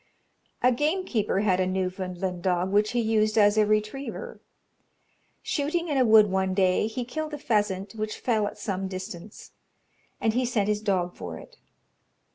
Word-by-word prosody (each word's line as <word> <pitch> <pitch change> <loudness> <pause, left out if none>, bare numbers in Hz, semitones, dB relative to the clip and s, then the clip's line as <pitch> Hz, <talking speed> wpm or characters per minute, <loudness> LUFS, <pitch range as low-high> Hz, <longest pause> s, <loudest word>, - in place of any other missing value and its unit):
A 250 - +6
gamekeeper 295 - 0
had 190 -3 +2
a 185 - +2
Newfoundland 185 -1 -3
dog 180 +1 0
which 210 +3 +2
he 240 - +1
used 220 -1 +1
as 205 -1 +5
a 215 -1 +3
retriever. 215 +6 -2 1.0
Shooting 325 +4 -1
in 290 - 0
a - - +5
wood 220 -1 +7
one 190 0 0
day, 185 +1 +2
he 240 +2 -4
killed 310 +4 -4
a - - -6
pheasant, 205 -6 -1
which 215 -1 -4
fell 220 -4 0
at 210 - -7
some 195 -2 -3
distance, 185 +1 -8 0.7
and 225 - +1
he 250 +2 +1
sent 235 -5 0
his 210 0 0
dog 185 -4 0
for 85 -2 -7
it. - - -14
210 Hz, 165 wpm, -26 LUFS, 190-235 Hz, 1.0 s, wood